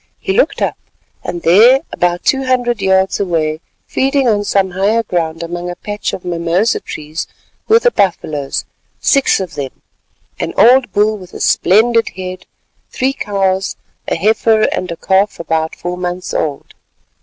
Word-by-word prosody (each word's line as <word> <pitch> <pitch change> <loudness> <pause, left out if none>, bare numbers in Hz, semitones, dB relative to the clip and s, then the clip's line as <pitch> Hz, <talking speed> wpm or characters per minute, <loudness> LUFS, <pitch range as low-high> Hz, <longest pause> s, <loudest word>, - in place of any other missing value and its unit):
He 385 - -2
looked - - +1
up, - - -2 0.4
and 175 -1 -5
there, 230 +10 +6
about 175 0 0
two 270 0 +1
hundred 245 -4 0
yards 190 0 +2
away, 160 -5 -1 0.3
feeding 270 0 +1
on 210 -3 +2
some 195 -2 +1
higher 205 +5 +1
ground 165 -4 -2
among 175 +1 -5
a 175 - -5
patch 205 +3 -4
of 185 - -7
mimosa 175 +5 0
trees, 155 +1 -6 0.4
were 445 - +6
the 485 +1 +2
buffaloes—six 170 - 0
of 185 -3 -5
them—an 135 -2 -9
old 245 -1 +5
bull 210 +1 +1
with 180 -1 -13
a - - -7
splendid 230 +4 +3
head, 185 0 -7 0.4
three 265 +1 -1
cows, 195 -4 -1 0.3
a - - 0
heifer 220 +4 +2
and 180 - -3
a 170 - -5
calf 195 +3 +1
about 160 -1 -1
four 175 0 -4
months 180 0 -4
old. 145 -3 -3
190 Hz, 150 wpm, -15 LUFS, 175-225 Hz, 0.4 s, there